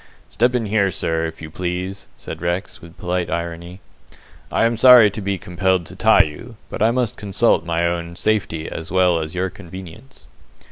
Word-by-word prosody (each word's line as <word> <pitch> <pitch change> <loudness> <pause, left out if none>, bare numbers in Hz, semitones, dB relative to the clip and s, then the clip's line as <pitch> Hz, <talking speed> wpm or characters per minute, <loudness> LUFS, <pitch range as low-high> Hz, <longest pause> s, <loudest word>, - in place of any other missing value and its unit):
"Step 120 +2 +2
in 120 -2 0
here, 100 -1 +2
sir, 80 -2 -1
if 80 0 -10
you 80 - -8
please," 90 +3 -4
said 80 - -8
Rex, 90 +3 -3
with 85 0 -14
polite 90 0 -2
irony. 85 +2 -5 0.7
"I - - +2
am 115 0 +1
sorry 120 -3 +8
to 105 - -6
be 100 0 -1
compelled 90 0 0
to - - -11
tie - - +5
you, 95 +11 -9 0.2
but - - -6
I 110 - +5
must 120 -1 -1
consult 100 -4 +1
my 85 0 0
own 85 0 -2
safety 95 -6 -1
as 80 - -7
well 90 -2 +3
as 80 +1 -5
your 95 +1 -1
convenience." 95 +10 -12
90 Hz, 185 wpm, -20 LUFS, 85-105 Hz, 0.7 s, sorry